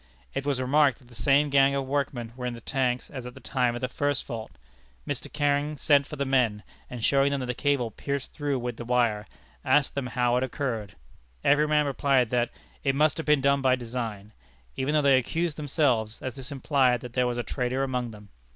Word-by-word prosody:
It 135 +1 -3
was 140 -3 0
remarked 140 +1 +3
that 125 -3 -21
the - - -16
same 140 +5 +2
gang 140 0 +5
of 135 -1 -1
workmen 130 -4 -2
were 125 -1 -4
in 120 - -4
the - - -9
tank 125 -2 0
as 130 -3 -6
at 125 - -10
the - - -10
time 125 -2 0
of 120 - -5
the 130 - 0
first 145 +2 -1
fault. 115 - -6 0.5
Mr. - - -4
Canning 145 0 0
sent 140 0 +3
for 150 - -7
the 140 -1 -2
men, 125 -6 +1 0.3
and 120 -2 -3
showing 140 0 +4
them 140 -2 -2
the 125 - -2
cable 130 -3 0
pierced 140 +4 -4
through 145 -3 -1
with 120 -2 -4
the - - -6
wire, 115 -4 +1 0.4
asked 145 -2 +3
them 140 -2 -2
how 125 -1 +1
it 125 - +1
occurred. 115 -6 -3 0.5
Every 150 +2 +4
man 150 0 +3
replied 135 -3 +2
that 120 -1 +1 0.3
it 135 -1 +1
must 150 +1 +3
have 160 - -5
been 150 -2 +4
done 140 +1 +3
by 130 -1 +4
design, 115 -4 -5 0.4
even 140 +3 -1
though 150 - +3
they 135 -2 +6
accused 165 +5 -2
themselves, 130 -8 0
as 130 - -5
this 135 +1 -8
implied 130 -3 +2
that 125 -1 -9
there 125 -1 +2
was 120 0 -2
a 120 - -1
traitor 130 +1 -1
among 125 -2 -2
them. 105 -2 -13
130 Hz, 220 wpm, -27 LUFS, 120-140 Hz, 0.5 s, they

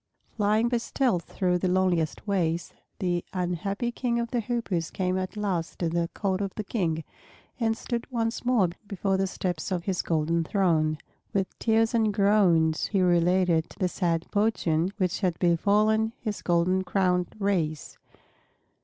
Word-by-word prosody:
Flying 215 +2 +2
by 240 0 +1
stealth 235 -6 0
through 180 -2 0
the 185 - 0
loneliest 180 -1 0
ways, 175 -4 0 0.2
the 175 -2 -1
unhappy 195 +6 -2
King 235 -1 -1
of 235 -1 -3
the 245 - +1
Hoopoes 215 -8 -2
came 185 -1 -1
at 185 +3 -3
last 185 -6 -2
to 170 - -1
the 170 0 -1
court 195 -1 -1
of 195 -1 -3
the 215 - -3
King, 170 -7 -1 0.6
and 225 -1 +1
stood 235 +2 -4
once 230 -2 -2
more 240 -8 +3 0.2
before 195 -1 -1
the 190 0 +1
steps 180 -2 -3
of 180 -2 -1
his 185 -1 -1
golden 165 +1 0
throne. 160 -4 +1 0.4
With 195 -1 -1
tears 225 0 +2
and 220 -2 +3
groans 195 -6 +3
he 200 - 0
related 175 -1 +3
the 185 - +1
sad 170 -2 -1
fortune 190 -5 +1
which 185 -4 0
had 180 -4 0
befallen 210 +6 +2
his 215 -3 -4
golden 180 +2 +2
crowned 180 -2 0
race. 175 -7 -1
185 Hz, 155 wpm, -27 LUFS, 170-215 Hz, 0.6 s, more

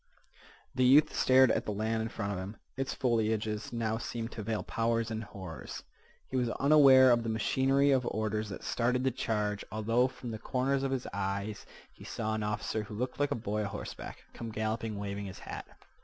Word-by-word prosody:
The 130 - +1
youth 140 +5 +6
stared 130 0 +5
at - - 0
the - - -2
land 110 +2 -1
in 110 - -2
front 100 -2 -3
of 90 - -4
him. 100 +3 -6 0.2
Its 135 0 -2
foliages 110 -3 0
now 115 -1 -1
seemed 115 0 -4
to 110 - -6
veil 110 0 -2
powers 115 0 0
and 110 0 -3
horrors. 95 - -8 0.4
He - - -6
was 125 -2 +1
unaware 135 -1 +7
of 120 -1 +4
the 115 - -3
machinery 135 +5 +2
of 130 -2 +2
orders 110 0 -1
that 95 - -7
started 125 +2 0
the 130 - +2
charge, 105 -4 -1
although 115 +4 +2
from 125 -2 -8
the 110 - -5
corners 135 +3 0
of 135 - 0
his 130 -2 -2
eyes 100 +1 -3 0.3
he - - -14
saw 110 0 -3
an 110 - -1
officer, 105 +1 -2
who 105 0 -8
looked 125 +3 -3
like 145 0 +2
a - - 0
boy 105 -2 -2
a 105 - -1
horseback, 100 - -7
come 115 - -6
galloping, 110 0 -2
waving 100 0 -4
his 95 - -8
hat. - - -7
110 Hz, 200 wpm, -31 LUFS, 105-125 Hz, 0.4 s, unaware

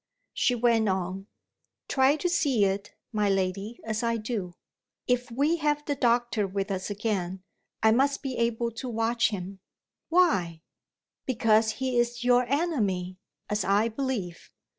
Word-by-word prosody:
She 245 - +2
went 230 -2 +2
on: 190 +1 -2 0.6
"Try 265 +1 +3
to 355 - -1
see 280 - +2
it, 195 +1 -3 0.2
my 210 -1 +1
lady, 195 +4 -1
as 220 0 -2
I 230 -1 0
do! 215 -6 -4 0.5
If 250 +1 0
we 285 +8 +1
have 295 -1 0
the 290 - 0
doctor 240 -5 +1
with 195 +1 -3
us 190 +1 -3
again, 195 -3 -2 0.4
I 220 - +6
must 275 +4 +2
be 265 -2 -3
able 235 0 0
to 235 +3 -6
watch 230 0 +1
him." 195 -2 -6 0.5
"Why?" 190 - +2 0.6
"Because 220 -3 +3
he 260 -1 -1
is 240 0 -1
your 245 0 +4
enemy, 210 - -1 0.3
as 210 -1 -1
I 205 +4 +2
believe." 225 -8 -4
230 Hz, 145 wpm, -27 LUFS, 195-250 Hz, 0.6 s, I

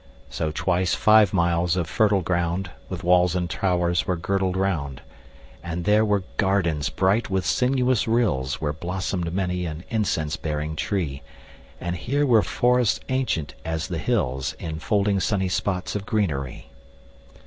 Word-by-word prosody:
5 - - -17
So 80 - -1
twice 90 +3 0
five 110 -2 +5
miles 85 -2 +1
of 90 - 0
fertile 100 +2 +2
ground 85 +1 -1 0.2
With - - -5
walls 90 0 +4
and 90 -1 0
towers 85 -1 0
were 90 - +1
girdled 95 +1 -1
round: 80 -9 -1 0.6
And 85 0 -4
there 105 +1 +4
were 105 -3 +1
gardens 90 -7 +1
bright 100 +5 +1
with 95 -1 0
sinuous 125 -2 +2
rills 85 - +1
Where 75 -1 -1
blossom'd 90 +1 -3
many 90 -1 -1
an 80 +1 -6
incense 90 -9 0
bearing 75 0 -3
tree; 75 -6 -2 0.6
And 85 0 -3
here 140 +11 0
were 115 -5 +5
forests 125 +1 +2
ancient 125 - -1
as 80 -1 -3
the - - -3
hills, 65 +1 -1
10 - - -6
Enfolding 100 +5 0
sunny 95 -1 0
spots 90 0 -2
of 100 -1 -4
greenery. 75 - -2
90 Hz, 150 wpm, -24 LUFS, 80-100 Hz, 0.6 s, five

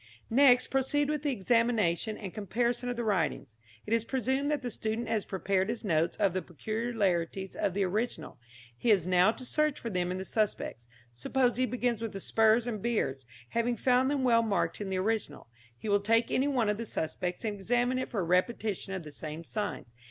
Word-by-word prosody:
Next 255 0 +5
proceed 280 +2 +1
with 300 -2 -1
the 295 - 0
examination 220 -3 +1
and 195 -4 -7
comparison 235 +4 -1
of 245 - -2
the 240 - -2
writings. 190 -8 0 0.4
It 220 - -2
is 230 -1 +3
presumed 265 +3 -1
that 295 -3 -1
the 245 - -3
student 220 +2 -3
has 215 -3 0
prepared 190 +1 0
his 230 -1 -3
notes 165 -3 +1
of 200 -4 +2
the 185 - -1
peculiarities 195 -1 -2
of 195 -3 -1
the 200 - +2
original; 195 - -3 0.4
he 175 - -1
has 195 -6 +4
now 185 +3 +4
to 255 +2 -8
search 305 +2 +1
for 230 - -5
them 180 -2 0
in 180 - -2
the 190 - -5
suspects. 200 - -2 0.3
Suppose 245 - +1
he 255 0 +2
begins 245 -3 -1
with 225 -2 -4
the 195 - -5
spurs 220 +3 +3
and 220 -4 -3
beards, 135 - -1 0.2
having 235 +1 0
found 255 +3 +3
them 280 -2 0
well 235 -2 +5
marked 215 -1 -1
in 200 - -3
the 190 - -1
original. 200 -6 -2 0.3
He 215 - -8
will 205 -1 +4
take 230 +3 +2
any 265 +2 +2
one 250 -6 +1
of 210 +1 0
the 230 - -4
suspects 175 +4 -3
and 215 - -1
examine 245 +5 0
it 255 - -3
for 205 - -1
a - - -1
repetition 195 +3 0
of 190 -3 -4
the 150 - -9
same 155 +2 -7
signs. 205 - -3
220 Hz, 210 wpm, -30 LUFS, 190-245 Hz, 0.4 s, Next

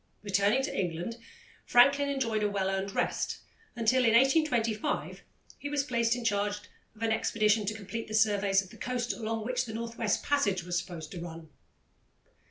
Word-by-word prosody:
Returning 205 +5 +2
to 285 - -3
England, 175 +5 -3 0.5
Franklin 280 +3 +5
enjoyed 235 -6 0
a 210 - +1
well 195 -1 -1
earned 195 +1 -3
rest, - - -1 0.4
until, 240 +2 +3
in 230 -2 +4
1825, 245 -5 +1 0.4
he 285 - -5
was 290 -1 0
placed 235 -3 +1
in 245 -2 -6
charge 205 -1 +1 0.4
of 220 - -8
an 225 - +1
expedition 215 -1 +2
to 215 - -1
complete 220 +2 -6
the 215 - -4
surveys 200 -2 +3
of 185 - -15
the - - -13
coast 245 -1 -2
along 225 -1 -3
which 250 +1 -1
the 220 -2 -7
North 230 0 -5
West 215 -3 0
Passage 205 -11 +1
was 175 0 -3
supposed 165 -3 -8
to 175 - -6
run. 165 -2 -8
220 Hz, 180 wpm, -30 LUFS, 200-245 Hz, 0.5 s, Franklin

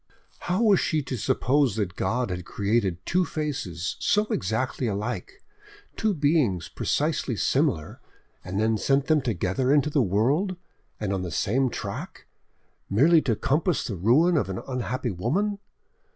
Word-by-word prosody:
How 185 +6 0
was 205 -4 +5
she 155 -2 0
to 130 - -4
suppose 130 +3 +1
that 100 -5 -2
God 120 -2 -1
had 90 0 -4
created 100 -1 0
two 185 +1 +2
faces 135 - -3
so 210 +1 +2
exactly 120 +6 -1
alike, 120 - -4 0.5
two 215 -3 0
beings 145 - +1
precisely - - -1
similar, 75 -1 0 0.4
and 95 +2 -3
then 110 0 +1
sent 135 +3 +2
them 155 -1 +3
together 115 +3 0
into 150 +1 +3
the 145 - +3
world, 130 - +1 0.4
and 100 -2 -2
on 95 - -1
the 90 - -4
same 125 - +1
track, 105 -4 -6 0.6
merely 155 +10 +5
to 115 -6 0
compass 160 - 0
the 105 - -4
ruin 140 - +3
of 130 - 0
an 95 - -3
unhappy 125 -1 -2
woman! 200 - -1
125 Hz, 150 wpm, -26 LUFS, 100-155 Hz, 0.6 s, was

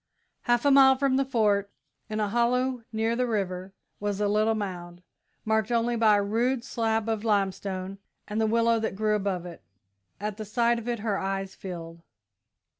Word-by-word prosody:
Half 240 +2 +3
a 285 - +5
mile 270 -1 +7
from 265 0 +1
the 275 - +3
Fort, 210 -6 +1 0.4
in 215 0 -3
a 210 -1 0
hollow 250 +2 +1
near 225 +1 0
the 250 +1 0
river, 190 -4 -2 0.3
was 205 -1 -2
a 210 - +1
little 215 +2 +2
mound, 180 -4 -6 0.4
marked 220 0 +1
only 235 0 +1
by 220 -2 +4
a 205 - +1
rude 235 +4 0
slab 225 -3 -1
of 220 -1 -1
limestone 195 -2 -1 0.3
and 215 +2 -2
the 220 - +2
willow 230 +1 +3
that 220 -3 -2
grew 215 +1 +1
above 195 -4 -1
it. 175 -2 -9 0.6
At 210 0 -4
the 215 - -5
sight 235 +2 +1
of 235 - -9
it 235 -3 -2
her 210 -3 -1
eyes 195 0 -3
filled. 170 -3 -8
215 Hz, 185 wpm, -27 LUFS, 195-235 Hz, 0.6 s, mile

